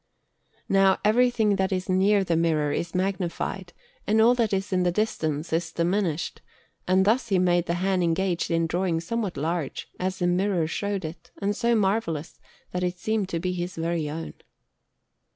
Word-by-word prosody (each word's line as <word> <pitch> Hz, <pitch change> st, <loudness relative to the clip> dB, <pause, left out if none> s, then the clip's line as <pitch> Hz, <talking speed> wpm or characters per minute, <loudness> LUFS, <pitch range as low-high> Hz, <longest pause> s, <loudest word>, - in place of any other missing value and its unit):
Now 195 Hz, -1 st, +4 dB
everything 220 Hz, -2 st, +3 dB
that 190 Hz, 0 st, 0 dB
is 185 Hz, -1 st, -1 dB
near 195 Hz, +2 st, +3 dB
the 175 Hz, -3 st, 0 dB
mirror 160 Hz, -3 st, +1 dB
is 170 Hz, +4 st, -3 dB
magnified, 185 Hz, 0 st, -2 dB, 0.4 s
and 215 Hz, +2 st, +3 dB
all 230 Hz, +2 st, +6 dB
that 235 Hz, -4 st, +1 dB
is 195 Hz, 0 st, -1 dB
at 180 Hz, -1 st, +2 dB
a -, -, +3 dB
distance 160 Hz, -7 st, -1 dB
is 165 Hz, 0 st, 0 dB
diminished, 175 Hz, -1 st, -1 dB, 0.5 s
and 190 Hz, +1 st, +4 dB
thus 235 Hz, +4 st, +2 dB
he 195 Hz, -4 st, +2 dB
made 175 Hz, -1 st, +2 dB
the 170 Hz, -, 0 dB
hand 185 Hz, +1 st, +1 dB
engaged 175 Hz, +1 st, 0 dB
in 165 Hz, -1 st, +1 dB
drawing 170 Hz, 0 st, 0 dB
somewhat 195 Hz, 0 st, -3 dB
large, 160 Hz, 0 st, -3 dB
as 185 Hz, +1 st, -2 dB
the 180 Hz, -, -1 dB
mirror 180 Hz, -1 st, +1 dB
showed 200 Hz, +2 st, -2 dB
it, 160 Hz, +1 st, -8 dB
and 205 Hz, 0 st, 0 dB
so 235 Hz, +1 st, +2 dB
marvellous 190 Hz, -7 st, -1 dB, 0.3 s
that 180 Hz, -, -2 dB
it 180 Hz, 0 st, -1 dB
seemed 215 Hz, 0 st, -1 dB
to 165 Hz, -, -2 dB
be 180 Hz, +1 st, -2 dB
his 175 Hz, 0 st, -4 dB
very 165 Hz, -2 st, -1 dB
own. 160 Hz, +2 st, -5 dB
185 Hz, 175 wpm, -26 LUFS, 170-200 Hz, 0.5 s, all